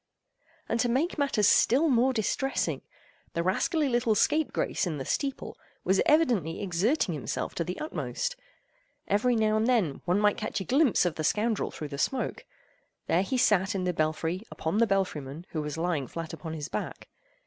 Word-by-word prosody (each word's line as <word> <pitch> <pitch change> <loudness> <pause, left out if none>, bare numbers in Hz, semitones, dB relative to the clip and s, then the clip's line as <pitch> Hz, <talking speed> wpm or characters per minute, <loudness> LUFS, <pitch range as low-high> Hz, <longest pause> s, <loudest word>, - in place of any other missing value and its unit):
And 230 - -1
to 245 - +2
make 295 +7 0
matters 270 -8 +2
still 280 +7 +4
more 255 -1 +3
distressing, 260 +3 -1 0.5
the 170 - -1
rascally 295 - +1
little 240 -3 +2
scape 310 +6 +2
grace - - -1
in 160 -3 -3
the 135 - -5
steeple 275 -2 -2 0.3
was 190 +1 +3
evidently 245 - +2
exerting 195 - +1
himself 150 - -3
to 170 - -1
the 180 +2 -5
utmost. 150 - -3 0.7
Every 230 +5 +2
now 215 -1 +2
and 220 +2 +1
then 215 - +1
one 180 +3 +2
might 210 -1 +3
catch - - -3
a - - -3
glimpse 265 - +3
of 175 - +1
the 155 - -2
scoundrel 215 +6 +1
through 150 - -7
the 140 -1 -6
smoke. 260 - -1 0.6
There 175 - +2
he 255 +7 -1
sat 205 -3 +3
in 190 - -1
the 180 0 0
belfry 160 +3 -1
upon 165 +7 -2
the 230 - +4
belfry 195 -6 0
man, 140 +6 -9
who 155 - -2
was 150 +1 -5
lying 165 -5 -1
flat 165 +3 -6
upon 160 -2 -6
his 150 -2 -5
back. - - -5
195 Hz, 185 wpm, -28 LUFS, 165-245 Hz, 0.7 s, still